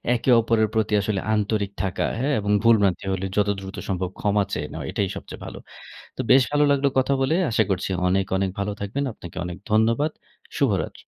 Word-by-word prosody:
একে 120 - -2
অপরের 110 -1 +2
প্রতি 110 -1 +1
আসলে 100 -1 -1 0.2
আন্তরিক 105 -1 -1
থাকা, 95 -2 -1
হ্যাঁ? 145 +3 0
এবং 105 0 -1
ভুল 115 0 +7
ভ্রান্তি 95 -1 +1
হলে 95 +1 -2
যত 105 0 +3
দ্রুত 95 0 -8
সম্ভব 90 -1 -1
ক্ষমা 105 0 +2
চেয়ে 75 0 -2
নেওয়া, - - -6
এটাই 100 - 0
সবচেয়ে - - -9
ভালো। - - -8 0.6
তো - - -4
বেশ 130 +1 +7
ভালো 145 0 +3
লাগলো 140 0 +3
কথা 130 +1 +2
বলে। 145 +4 +2 0.2
আশা 110 - +3
করছি 95 0 -1 0.2
অনেক, 95 +1 +1
অনেক 95 0 0
ভালো 100 +1 -1
থাকবেন। 110 +8 -2
আপনাকে 90 -5 -12
অনেক 90 0 -5
ধন্যবাদ। 115 +8 +2 0.5
শুভরাত্রি। - - 0
105 Hz, 195 wpm, -24 LUFS, 95-115 Hz, 0.6 s, ভুল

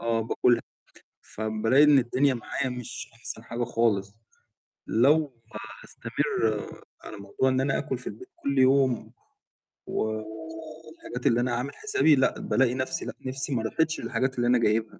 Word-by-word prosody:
آه 115 -1 0
باكلها، 115 +1 +2 0.6
فبالاقي 110 +5 +1
إن 150 -2 +6
الدنيا 130 +3 +2
معايا 130 +2 -3
مش 125 -2 -6
أحسن 115 -1 -1
حاجة 120 +1 -4
خالص، 110 -4 0 0.7
لو 135 0 +2 0.4
هاستمر 110 -2 -2 0.4
على 110 - -9
موضوع 100 +6 -1
إن 130 0 +1
أنا 135 +1 0
آكُل 130 - -3
في 125 - -10
البيت 380 +2 -11
كل 285 -5 -2
يوم، 130 -2 +3 0.8
و - - -2 0.8
والحاجات 155 -6 -5
اللي 115 - +3
أنا 125 0 -1
عامل 125 +4 -4
حسابي 405 - +4
لأ، 130 - +1
بالاقي 125 -2 +1
نفَسي 130 +6 -1
لأ، - - -5
نِفسي 135 +1 +3
ما 115 - -1
راحتش 160 +8 0
للحاجات 130 +3 -1
اللي 120 0 +1
أنا 125 +1 +4
جايبها. 110 -1 0
125 Hz, 150 wpm, -26 LUFS, 115-135 Hz, 0.8 s, إن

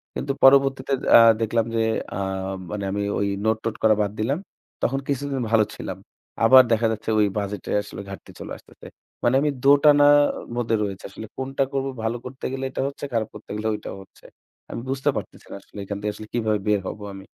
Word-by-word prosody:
কিন্তু 140 - -2
পরবর্তীতে 135 0 +5 0.2
আ - - +9 0.2
দেখলাম 115 0 +1
যে 115 - +2 0.4
আ - - -3 0.5
মানে 105 -1 -4
আমি 100 +1 -2 0.2
ওই 100 - +1 0.2
নোট-টোট 110 0 0
করা 110 -1 +5
বাদ 100 -1 0
দিলাম। 135 +9 0 0.4
তখন 135 +3 +1
কিছুদিন 140 -1 -2
ভালো 115 -2 +5
ছিলাম। - - -6 0.5
আবার 130 +2 +9
দেখা 115 0 +3
যাচ্ছে 110 0 -4
ওই 105 - +5
বাজেট 100 0 -3
এ - - 0
আসলে - - -8
ঘাটতি 100 - -10
চলে - - -8
আসতেছে। - - -16 0.4
মানে 120 +2 +3
আমি 150 - +2
দো - - +2 0.2
টানা 145 -1 +7 0.5
মধ্যে 115 -2 0
রয়েছি। 100 -2 -5
আসলে 110 +3 -9
কোনটা 135 +1 -1
করব 135 -1 -1 0.2
ভালো 110 +2 -1
করতে 130 +1 -8
গেলে 135 0 -4
এটা - - -3
হচ্ছে, 140 +1 -6
খারাপ 110 -2 0
করতে 105 - -13
গেলে 105 +1 -2
ঐটা 105 - -6
হচ্ছে। 95 - -19 0.5
আমি - - -5
বুঝতে 135 0 0
পারতেছি - - -7
না - - -6
আসলে - - -12
এখান 100 +1 -4
থেকে 105 0 -1
আসলে 110 - -10
কিভাবে 110 -3 0
বের 105 -1 +3
হবো 105 - -6
আমি? 95 0 -10
115 Hz, 200 wpm, -23 LUFS, 105-135 Hz, 0.5 s, আ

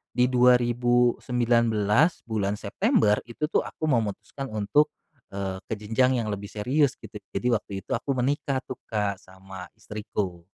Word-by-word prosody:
di 125 - +4
2019 120 - +3
bulan 105 -3 -1
September 110 - +2
itu, 120 +6 -3
tuh, - - +3
aku - - -10
memutuskan 120 +3 -2
untuk, 145 +9 +2 0.4
eee, 95 -1 -3
ke - - -4
jenjang 120 +4 +1
yang - - -3
lebih 100 0 -6
serius 130 +6 +1
gitu. 105 - -9 0.2
Jadi 125 - -1
waktu 105 -2 -2
itu - - -12
aku 140 - -2
menikah 140 +1 0
tuh, 130 - -7
Kak, 105 -3 -1
sama 95 0 -11
istriku. 100 -5 -5
115 Hz, 140 wpm, -26 LUFS, 105-125 Hz, 0.4 s, di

